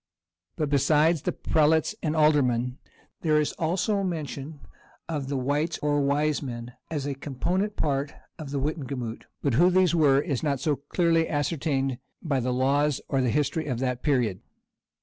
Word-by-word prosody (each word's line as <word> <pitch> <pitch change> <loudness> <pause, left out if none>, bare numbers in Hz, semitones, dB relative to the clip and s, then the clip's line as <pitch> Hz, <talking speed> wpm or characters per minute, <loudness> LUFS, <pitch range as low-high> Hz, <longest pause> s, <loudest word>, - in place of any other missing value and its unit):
But 150 -2 -2
besides 150 +3 +3
the - - -1
prelates 155 0 +2
and 155 0 -1
aldermen, 130 -5 +2 0.4
there 155 -2 +3
is 150 - 0
also 190 +5 +1
mention 155 -5 -4 0.5
of 150 -5 -3
the 140 0 -2
wites, 145 +5 0
or 145 -1 +1
wisemen, 140 -4 -1 0.2
as 150 -4 -3
a 145 - -2
component 175 +9 -2
part 140 -1 -1 0.3
of 155 -3 -6
the 140 - -3
wittenagemot; 135 -5 -4 0.2
but 140 - +1
who 170 +9 +5
these 185 -1 +3
were 145 -5 +4
is 140 -4 -2
not 140 -4 0
so 145 +2 +1
clearly 165 +3 +1
ascertained 145 -3 -1 0.2
by 145 -6 -1
the 125 +1 -1
laws 140 +3 +2
or 135 - +1
the 125 - +1
history 150 +4 0
of 125 -4 -1
that 125 -1 -2
period. 120 -10 +1
145 Hz, 160 wpm, -26 LUFS, 135-155 Hz, 0.5 s, who